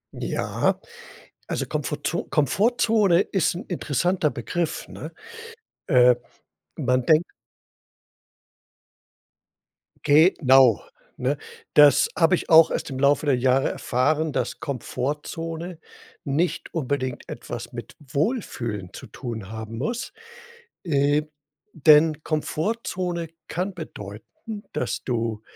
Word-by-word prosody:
Ja, - - -1 0.7
also, - - -2
Komfortzo - - -3
Komfortzone 200 - +3
ist 190 -4 0
'n 175 - -6
interessanter 175 0 0
Begriff, 170 +2 -3
ne? 155 - -8 0.7
Äh, 125 -6 +6 0.6
man 125 0 +1
denkt 160 +2 +5 2.8
genau, 135 - +5 0.4
ne? 130 +3 0 0.4
Das 145 -3 +6
hab 165 +1 +3
ich 180 - 0
auch 160 -1 +7
erst - - -3
im 130 -1 -5
Laufe 140 +2 +3
der 140 -3 +3
Jahre 130 +2 +2
erfahren, 150 +5 0
dass - - -2
Komfortzone 160 +6 -4 0.4
nicht 155 +5 -1
unbedingt 130 -4 -3
etwas - - -7
mit - - -8
Wohlfühlen 135 - -3
zu - - -9
tun 110 -5 -7
haben 110 0 -7
muss. 240 - -3 0.7
Äh, 145 -2 +2 0.5
denn 155 0 +5
Komfortzone 170 +1 -2 0.2
kann 185 +3 -3
bedeuten, 160 - -9
dass - - -2
du 115 -3 -2
150 Hz, 100 wpm, -24 LUFS, 130-175 Hz, 2.8 s, auch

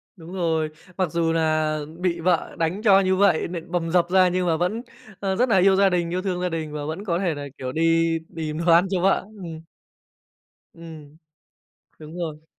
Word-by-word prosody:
Đúng 170 -1 -11
rồi. 165 -4 0 0.3
Mặc 185 -4 0
dù 165 0 +1
là 155 -1 +1 0.2
bị 180 -2 -1
vợ 175 0 0
đánh 165 +5 -1
cho 200 -3 +6
như 190 -1 +2
vậy, 190 -4 +3
nện 170 0 -7
bầm 170 -2 -1
dập 175 -1 +2
ra 185 0 +5
nhưng 180 0 0
mà 165 -2 +2
vẫn, 180 +7 -1 0.4
ơ, 195 -1 -1
rất 245 +5 +1
là 210 - +4
yêu 190 +1 +5
gia 195 0 +4
đình, 175 -2 0
yêu 180 +2 -2
thương 185 -2 -2
gia 180 - 0
đình 160 -2 -4
và 150 -1 -4
vẫn 160 +7 -5
có 170 -3 0
thể 180 -4 0
là, 145 0 -6
kiểu, 130 -1 -4
đi 165 +1 +2 0.2
tìm 155 -2 -4
đồ 175 - +4
ăn 170 +3 +5
cho 185 -2 0
vợ, 195 +1 +2 0.2
ừm. 160 -2 -8 1.1
Ừm, 160 -3 -12 0.8
đúng 155 +2 -10
rồi. 160 -3 -5
170 Hz, 210 wpm, -23 LUFS, 160-185 Hz, 1.1 s, cho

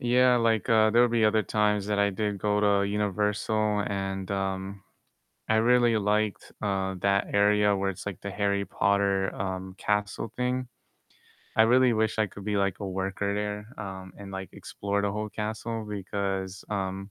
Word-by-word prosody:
Yeah, 125 +1 +4
like, 115 -4 +1
uh, 110 -1 +5
there 120 +2 +5
would 120 - +3
be 115 -1 +2
other 110 0 +3
times 105 +1 +1
that 105 -1 0
i 100 0 +3
did 100 +1 -2
go 105 +1 +1
to 100 -1 +3
Universal 105 +1 0
and 95 -1 -3
um, 95 0 -3 0.7
I 110 - +3
really 120 +1 +4
liked, 105 0 0
uh, 95 -2 -1
that 100 +1 +2
area 105 0 +4
where 95 0 0
it's, 95 - -9
like, 100 -3 -5
the 100 - -5
Harry 100 0 0
Potter, 100 -1 +1
um, 95 -1 -4
castle 105 +1 -1
thing. 125 0 -1 0.9
I 110 - +7
really 125 +2 +5
wish 110 0 0
I 110 - +3
could 100 0 -11
be, 105 0 -1
like, 100 -2 0
a 100 - -4
worker 95 +1 -2
there, 105 0 -3 0.2
um, 95 -1 -8
and, 100 -1 -9
like, 95 0 -6
explore 100 0 -3
the 100 - +1
whole 105 +1 -3
castle 110 +1 -4
because, 100 -1 -3
um 95 0 -3
100 Hz, 175 wpm, -27 LUFS, 100-110 Hz, 0.9 s, I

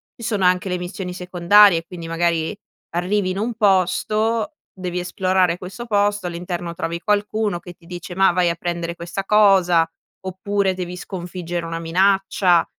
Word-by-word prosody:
ci 230 - -11
sono 205 -5 0
anche 180 +1 +2
le 180 - -1
missioni 180 +1 -5
secondarie. 180 0 +4
Quindi 170 -2 -8
magari 165 +2 0 0.4
arrivi 185 +2 0
in 190 - -4
un 230 +3 -1
posto, 215 - +1 0.2
devi 180 -2 -5
esplorare 185 0 +1
questo 195 +6 -8
posto, 205 -2 +1
all'interno 175 0 -4
trovi 170 0 -3
qualcuno 210 -1 0
che 175 0 -11
ti 170 - -24
dice: 175 0 -7
"Mah, 190 -1 +5
vai 175 -1 +2
a 170 - -1
prendere 170 0 -3
questa 175 +3 -5
cosa", 190 -6 +4 0.3
oppure 190 +1 -1
devi 180 -1 -5
sconfiggere 175 -2 -5
una 165 0 -4
minaccia. 185 +1 +2
180 Hz, 155 wpm, -21 LUFS, 175-200 Hz, 0.4 s, Mah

